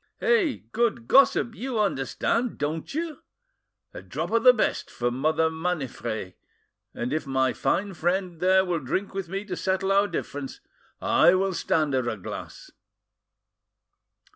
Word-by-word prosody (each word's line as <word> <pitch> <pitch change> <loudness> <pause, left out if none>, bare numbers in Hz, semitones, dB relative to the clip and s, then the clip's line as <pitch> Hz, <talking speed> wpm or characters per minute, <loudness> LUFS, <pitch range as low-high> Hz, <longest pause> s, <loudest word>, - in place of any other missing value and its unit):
Eh, 460 - +2
good 235 0 0
gossip, 265 -3 +4
you 245 -1 -3
understand, 210 - 0
don't 155 - -3
you? 325 -1 -3 0.7
A - - -8
drop - - -5
of 230 0 +3
the 250 - +9
best 245 - -1
for 120 0 -2
Mother 155 +5 +1
Maniffret, 135 - -3 0.6
and 120 +3 -3
if 155 -2 -2
my 130 -1 +1
fine 190 +9 0
friend 175 0 -1
there 190 +1 +4
will 175 -2 -1
drink 170 +10 -3
with 190 -3 -4
me 195 +2 -4
to 185 -3 -4
settle 190 +1 0
our 200 +1 +4
difference, 145 -6 -5 0.4
I 175 - +4
will 190 0 +1
stand 155 -4 0
her 130 -2 +1
a 110 - -4
glass." 95 - -8
185 Hz, 145 wpm, -26 LUFS, 145-215 Hz, 0.7 s, the